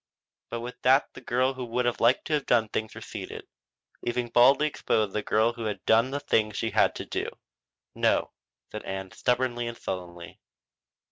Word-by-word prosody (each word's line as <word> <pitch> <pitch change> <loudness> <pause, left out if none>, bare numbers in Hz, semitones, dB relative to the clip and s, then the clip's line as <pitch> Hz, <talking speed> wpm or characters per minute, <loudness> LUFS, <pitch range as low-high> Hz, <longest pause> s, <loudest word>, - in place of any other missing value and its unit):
But 115 - -4
with 125 +1 -8
that 130 +2 +4
the - - -11
girl 130 +2 +1
who 130 -1 -6
would 120 0 -1
like 120 +3 +4
to 155 - -3
have 145 -2 0
done 115 -3 +3
things 110 +1 -3
receded, - - -7 0.6
leaving 120 0 -2
baldly 130 +6 +5
exposed 110 -8 0
the 105 - 0
girl 110 +3 +2
who 115 -1 -6
had 105 -3 -4
done 115 +3 +4
the 140 +1 -2
things 110 -7 +1
she - - -1
had - - 0
had - - +3
to - - -5
do. - - -3 0.6
"No," - - +1 0.4
said 110 - -5
Ann 95 -1 -5
stubbornly 120 -1 0
and 120 - -6
sullenly. 85 -2 -6
120 Hz, 185 wpm, -27 LUFS, 110-125 Hz, 0.6 s, baldly